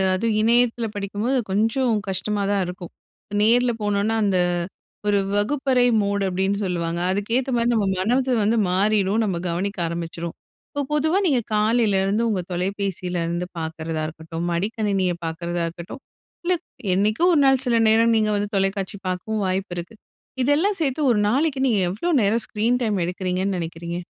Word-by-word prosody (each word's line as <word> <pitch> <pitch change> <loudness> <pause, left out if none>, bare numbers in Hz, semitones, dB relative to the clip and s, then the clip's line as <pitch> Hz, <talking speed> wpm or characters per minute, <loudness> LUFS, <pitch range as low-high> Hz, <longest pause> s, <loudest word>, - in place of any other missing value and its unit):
அதும் 220 +2 0
இணையத்தில 235 0 +2
படிக்கும்போது, 205 +6 -1
கொஞ்சம் 225 +4 +2 0.2
கஷ்டமா 200 +2 -1
தான் 200 -2 +1
இருக்கும். 180 -1 -8 0.3
இப்ப 205 - -5
நேர்ல 240 +2 +4
போனோம்ன்னா, 205 +2 0
அந்த 190 -3 +2 0.7
ஒரு 205 -1 +3 0.2
வகுப்பறை 255 +3 +2 0.2
மோட், 200 0 0
அப்டின்னு 190 +2 0
சொல்லுவாங்க. 170 -1 -2
அதுக்கேத்த 230 +7 -1
மாரி 235 +1 +1
நம்ம 210 -3 +1
மனது 250 +7 +1
வந்து 225 +3 +2
மாறிரும். 200 +2 +2
நம்ம 185 -4 -1
கவனிக்க 195 +4 -2
ஆரம்பிச்சுருவோம். 170 0 -5 0.4
இப்போ 285 - -2
பொதுவா 315 +5 +2
நீங்க 265 -5 +3 0.2
காலையிலருந்து 210 -1 +2
உங்க 190 -4 0
தொலைபேசியிலருந்து 180 -2 -2
பாக்கிறதா 160 0 -4
இருக்கட்டும், 165 +1 -6
மடிக்கணினிய 195 -1 0
பாக்கிறதா 170 +1 -3
இருக்கட்டும், 175 +10 -9 0.4
இல்லை 355 0 +1 0.4
என்னைக்கோ 215 - +1
ஒரு 295 - +4
நாள் 265 -1 +4
சில 235 -2 +2
நேரம் 230 +1 +4
நீங்க 215 -1 +2
வந்து 205 0 -2
தொலைக்காட்சி 195 0 -1
பாக்கவும் 205 +3 -2
வாய்ப்பு 185 0 -2
இருக்கு. 175 +6 -7 0.5
இதெல்லாம் 315 +10 +2
சேத்து 280 0 0
1 210 - +2
நாளைக்கு 275 +2 +1
நீங்க 215 -5 +2
எவ்வளோ 215 - -2
நேரம் 215 +3 +2
ஸ்கிரீன் 230 +3 +1
டைம் 210 -5 0
எடுக்கறீங்கன்னு 185 +1 -2
நெனைக்கிறீங்க? 170 +1 -5
205 Hz, 145 wpm, -23 LUFS, 180-230 Hz, 0.7 s, நேர்ல